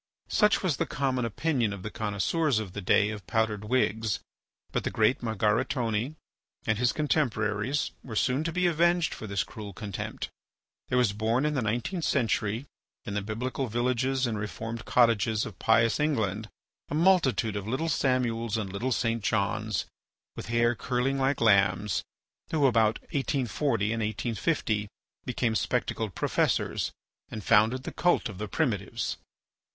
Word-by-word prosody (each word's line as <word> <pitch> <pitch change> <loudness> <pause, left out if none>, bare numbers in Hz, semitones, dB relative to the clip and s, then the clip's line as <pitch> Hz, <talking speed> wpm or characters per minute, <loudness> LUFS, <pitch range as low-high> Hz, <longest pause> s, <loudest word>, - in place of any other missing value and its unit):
Such 210 -1 +3
was 170 -7 +1
the - - -1
common 130 -3 0
opinion 120 -2 0
of 95 -2 -8
the 105 - -5
connoisseurs 110 - 0
of 105 -4 -3
the 100 - -4
days 105 +3 +3
of 100 -5 -9
powdered 105 +2 0
wigs. 110 -2 +1 0.5
But - - -1
the - - -1
great 110 +3 +2
Margaritone 115 +3 0 0.5
and 110 - +1
his 125 0 +3
contemporaries 125 -4 0
were 115 -4 -7
soon 130 +6 +1
to 165 - 0
be 180 +2 0
avenged 170 0 +3
for 110 - -7
this 100 -3 0
cruel 105 -2 -9
contempt. 100 -1 -5 0.6
There 125 - +1
was 120 -5 +3
born 110 +6 +1
in 150 - +1
the 135 - 0
nineteenth 120 - -2
century, 115 -3 0 0.4
in 100 - -4
the 105 - 0
biblical 125 +6 -3
villages 125 +3 0
and 110 -3 -2
reformed 115 +2 -5
cottages 110 -3 +3
of 105 - -9
pious 115 +2 +3
England, 110 -8 0 0.4
a - - -2
multitude 150 - +3
of 100 0 -4
little 135 +8 -1
Samuels 120 -6 +1
and 100 -4 -4
little 120 +6 -2
St. 115 -1 0
Johns, 110 0 0 0.5
with - - -7
hair 120 +1 +3
curling 125 +3 -1
like 135 +1 +1
lambs, 100 -2 +3 0.5
who, 150 -3 +2
about 115 -4 +4 0.2
1840, 130 -5 0
and 115 - -2
1850, 110 - -1 0.4
became 125 -2 0
spectacled 110 -4 -1
professors - - 0 0.4
and 110 - -6
founded 115 +5 +4
the - - -6
cult 175 -8 +2
of 95 -3 -9
the 105 - -3
primitives. - - -1
115 Hz, 155 wpm, -28 LUFS, 105-130 Hz, 0.6 s, about